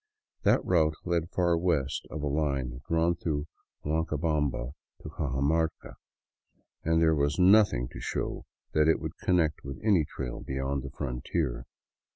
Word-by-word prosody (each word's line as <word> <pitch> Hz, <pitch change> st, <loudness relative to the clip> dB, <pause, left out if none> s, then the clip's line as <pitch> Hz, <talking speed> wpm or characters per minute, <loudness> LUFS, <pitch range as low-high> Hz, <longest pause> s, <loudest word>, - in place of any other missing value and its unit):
That -, -, +3 dB
route 80 Hz, -4 st, +3 dB
led 85 Hz, -1 st, 0 dB
far 85 Hz, -2 st, +2 dB
west 80 Hz, -6 st, 0 dB
of 75 Hz, -1 st, -5 dB
a -, -, 0 dB
line 70 Hz, -4 st, -1 dB
drawn 85 Hz, +1 st, +3 dB
through 75 Hz, -3 st, -2 dB, 0.4 s
Huancabamba 75 Hz, -4 st, 0 dB, 0.3 s
to -, -, -6 dB
Cajamarca, 75 Hz, +1 st, -1 dB, 0.9 s
and 80 Hz, 0 st, +2 dB
there 80 Hz, -1 st, +4 dB
was 70 Hz, -1 st, +1 dB
nothing 95 Hz, -, +5 dB
to -, -, -9 dB
show -, -, -3 dB, 0.3 s
that 75 Hz, 0 st, +3 dB
it 80 Hz, -, +4 dB
would -, -, -5 dB
connect 85 Hz, -5 st, +1 dB
with 70 Hz, -1 st, -7 dB
any 100 Hz, -7 st, +4 dB
trail 60 Hz, -4 st, -6 dB
beyond 65 Hz, +1 st, -2 dB
the 70 Hz, -, -6 dB
frontier. 65 Hz, -1 st, -3 dB
75 Hz, 145 wpm, -29 LUFS, 70-80 Hz, 0.9 s, nothing